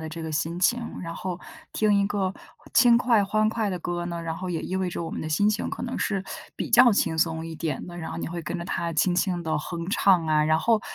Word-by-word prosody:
的 160 - -5
这 165 +1 -7
个 160 -1 -5
心 165 +3 -2
情， 240 +6 +2 0.2
然 165 -2 -6
后 185 0 -4 0.3
听 210 -1 +2
一 - - +2
个 195 -2 -1 0.4
轻 240 -2 +6
快、 235 -4 +3
欢 215 +2 +1
快 220 -2 -1
的 180 - -3
歌 175 0 -3
呢， 170 -1 -4
然 165 -1 -4
后 185 +1 -5
也 165 -2 -2
意 185 - -4
味 190 -1 -1
着 170 - -4
我 - - -4
们 - - -5
的 155 - -4
心 180 +7 +2
情 215 +1 -1
可 - - -6
能 245 - -4
是 195 -2 -1 0.3
比 - - -3
较 240 0 +7
轻 165 -5 +1
松 160 0 0
一 165 - -7
点 155 -3 -3
的， 175 -1 -9
然 165 -2 -5
后 - - -5
你 - - -3
会 170 0 -5
跟 175 +3 -4
着 170 - -5
它 170 -2 -2
轻 175 +3 +2
轻 180 -1 0
地 160 - 0
哼 170 +3 -5
唱 190 -5 +3
啊。 155 -1 +3
然 155 +1 +3
后 225 +4 +2
175 Hz, 290 characters per minute, -25 LUFS, 165-205 Hz, 0.4 s, 较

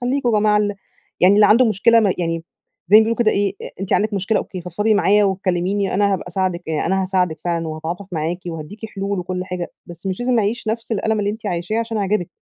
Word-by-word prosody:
خليكم 250 +1 0
يا 230 - +2
جماعة 210 0 +3
ال 205 -1 +1 0.5
يعني 185 +3 +6
اللي 210 0 +6
عنده 235 +5 +5
مشكلة 230 +1 +4
ما 200 -4 +2
يعني، 165 -1 -2 0.4
زي 210 - +8
ما - - +9
بيقولوا 225 +1 0
كده 230 -3 +3
إيه؟ 200 -2 0
أ - - -7
أنتِ 195 - -3
عندِك 215 0 +1
مشكلة 200 +2 0
أوكي، 185 - -6
فضفضي 205 +5 0
معايا 205 0 +4
وكلميني 190 0 0
أنا 200 +1 +2
هابقى 185 - -3
أساعدِك 180 -1 -1
يع 155 -1 -1
أنا 190 +2 +1
هاساعدِك 180 -4 0
فعلًا 170 -2 -1
وهاتعاطف 160 +5 -5
معاكِ 160 +2 -2
وهاديكِ 175 +7 -7
حلول 200 -1 -3
وكل 180 +1 -3
حاجة، 180 -1 -5 0.2
بس 175 +2 -10
مش 190 +3 -3
لازم 245 -1 +1
أعيش 220 +2 -2
نفس 225 +1 -3
الألم 220 +1 0
اللي 205 - 0
أنتِ 215 0 -7
عايشاه 180 +4 -2
عشان 230 -1 -2
أعجبِك، 195 -3 -1
195 Hz, 225 wpm, -20 LUFS, 180-215 Hz, 0.5 s, ما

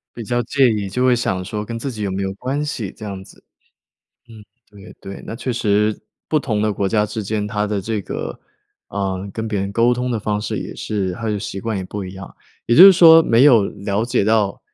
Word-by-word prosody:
比 115 - -6
较 120 +3 -1
介 130 +1 +3
意， 105 -3 -2
就 125 +7 0
会 125 - +4
想 95 -6 -2
说 105 +1 -4
跟 115 +2 -6
自 135 +4 -4
己 110 -3 -7
有 100 - -2
没 95 +1 -2
有 95 0 -3
关 135 +6 -3
系 115 -9 -4
这 110 - -9
样 95 -2 -6
子， - - -19 0.9
嗯， 110 -2 -13 0.3
对 100 0 -14
对。 95 0 -9
那 - - -6
确 130 0 -3
实 105 -2 +1 0.3
不 155 - +2
同 110 -7 -2
的 105 -1 +1
国 100 -1 -1
家 105 +1 +2
之 105 +1 -5
间， 105 +1 -2
它 105 0 -2
的 105 -1 -2
这 110 +2 -3
个， - - -6 0.5
呃， 95 -1 -3
跟 110 0 -4
别 105 -3 -2
人 100 0 -3
沟 115 +2 +3
通 125 +1 -2
的 115 - -1
方 105 0 -2
式 105 - -3
也 - - -6
是， 95 -4 -3
它 115 +5 -6
的 105 -1 -1
习 95 0 -6
惯 115 0 -3
也 95 - -4
不 100 +1 -6
一 90 +1 -8
样。 95 -1 -10 0.3
也 120 - +3
就 180 - +10
是 195 - +10
说 165 -2 +8
没 120 +1 +4
有 120 -8 +6
了 100 +2 -3
解 120 -4 0
到， 110 -2 +1
105 Hz, 260 characters per minute, -19 LUFS, 100-120 Hz, 0.9 s, 就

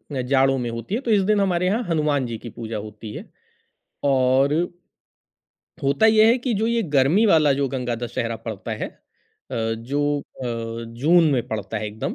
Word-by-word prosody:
अ, 130 - 0
जाड़ों 135 +1 +2
में 120 -1 -2
होती 115 - -4
है, 250 - -2
तो 235 - -1
इस 205 -2 +4
दिन 210 +1 +2
हमारे 180 -2 +1
यहाँ 215 +6 +1
हनुमान 150 -4 +1
जी 115 -2 -5
की 120 - -9
पूजा 115 -1 -6
होती 105 +1 -8
है। - - -7 0.8
और 135 0 +3 1.3
होता 140 +10 +3
ये 220 0 +6
है 235 +3 +4
कि 245 -2 -1
जो 220 +3 0
ये 235 0 +1
गर्मी 150 +7 +3
वाला 155 -6 +5
जो 140 +1 0
गंगा 125 -2 -2
दशहरा 115 -1 -3
पड़ता - - -7
है - - -3 0.6
अ, - - -4
जो 125 +6 -1
अ, 115 -4 -6 0.2
जून 165 +2 +5
में 125 -3 0
पड़ता 110 0 -4
है 105 - -4
एकदम, 105 +1 -4
135 Hz, 190 wpm, -23 LUFS, 115-175 Hz, 1.3 s, ये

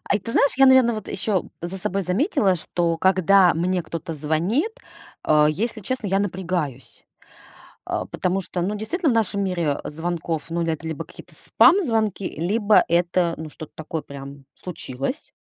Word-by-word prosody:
Ай, - - +2
ты 230 - -6
знаешь, 280 - +3
я, 270 0 +6
наверное, 260 -3 +6
вот 215 -2 -7
ещё 195 -2 -1 0.2
за 175 +2 -4
собой 195 +2 -2
заметила, 200 - +1
что 170 0 -1
когда 190 0 +4
мне 180 +2 0
кто-то 165 0 -6
звонит, 165 - 0 0.5
э, 150 -1 +4
если 220 +8 -3
честно, 240 +2 -3
я 195 +1 +2
напрягаюсь. 175 -9 -3 0.8
Э, - - -2
потому 185 +1 -1
что, 180 -1 -4
ну, 200 +4 -1
действительно, 310 - -1
в - - 0
нашем 200 -3 0
мире, 170 -6 -1
э, - - -4
звонков, 165 0 -4
ну, 170 +1 -1
это 165 -1 -2
либо 160 -3 -4
какие-то - - -15
спам-звонки, 225 - +3
либо 205 +5 +3
это, 175 0 +1
ну, 160 -1 -7
что-то 155 0 -11
такое 155 0 -5
прям 140 0 -10
случилось. 140 - -6
180 Hz, 165 wpm, -23 LUFS, 160-210 Hz, 0.8 s, я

